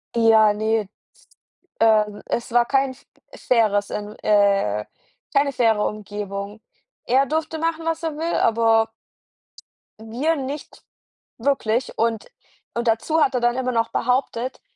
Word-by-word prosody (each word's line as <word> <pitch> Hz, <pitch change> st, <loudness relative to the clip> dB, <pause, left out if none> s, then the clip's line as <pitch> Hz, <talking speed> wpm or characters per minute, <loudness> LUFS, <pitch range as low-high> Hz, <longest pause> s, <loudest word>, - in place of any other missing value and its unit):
Ja, 220 Hz, -2 st, +5 dB
ne, 220 Hz, +1 st, 0 dB
ist 195 Hz, -, -11 dB, 0.9 s
ähm, 215 Hz, -2 st, +3 dB
es 235 Hz, -, -3 dB
war 240 Hz, 0 st, +4 dB
kein 270 Hz, +1 st, +1 dB
f 260 Hz, -, -17 dB, 0.4 s
faires, 210 Hz, -4 st, +2 dB
ähm, 210 Hz, 0 st, -5 dB
äh 200 Hz, -, +2 dB, 0.5 s
keine 280 Hz, 0 st, +3 dB
faire 225 Hz, -5 st, +2 dB
Umgebung. 205 Hz, 0 st, -6 dB, 0.4 s
Er 265 Hz, +3 st, +3 dB
durfte 315 Hz, +2 st, -2 dB
machen, 330 Hz, 0 st, -2 dB
was 325 Hz, 0 st, -1 dB
er 320 Hz, -2 st, -2 dB
will, 330 Hz, +2 st, -2 dB
aber 225 Hz, 0 st, +3 dB, 1.1 s
wir 250 Hz, +9 st, -1 dB
nicht 280 Hz, +1 st, -7 dB, 0.6 s
wirklich 245 Hz, -2 st, 0 dB
und 225 Hz, -1 st, -1 dB, 0.5 s
und 235 Hz, 0 st, -2 dB
dazu 270 Hz, +8 st, +1 dB
hat 270 Hz, -, +3 dB
er 250 Hz, -, 0 dB
dann 240 Hz, +1 st, +1 dB
immer 255 Hz, -1 st, -1 dB
noch 230 Hz, -1 st, 0 dB
behauptet, 250 Hz, 0 st, -1 dB
230 Hz, 135 wpm, -22 LUFS, 215-270 Hz, 1.1 s, Ja